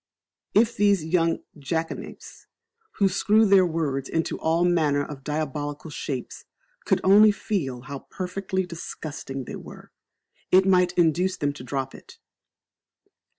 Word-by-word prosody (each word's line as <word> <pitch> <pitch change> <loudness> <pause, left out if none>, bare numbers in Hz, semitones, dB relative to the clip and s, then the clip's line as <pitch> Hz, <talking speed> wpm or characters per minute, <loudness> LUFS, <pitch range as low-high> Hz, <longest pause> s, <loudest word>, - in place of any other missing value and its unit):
If 230 +3 +4
these 200 -5 +3
young 165 0 +1 0.2
jackanapes, 160 +4 -5 0.5
who 200 - +2
screw 210 +3 +3
their 195 -3 +5
words 145 -5 -2
into 165 0 -1
all 165 +2 +2
manner 150 -5 +2
of 140 -3 -9
diabolical 150 0 -4
shapes, 130 -4 -5 0.4
could - - +2
only 210 +3 +7
feel 150 - -3
how 140 0 -9
perfectly 190 0 -3
disgusting 155 -5 -7
they - - -6
were, - - -12 0.6
it 190 +1 +5
might 180 -2 +3
induce 175 +2 +2
them 145 -2 -1
to 140 - -10
drop 135 +1 -3
it. - - -14
165 Hz, 130 wpm, -25 LUFS, 145-190 Hz, 0.6 s, only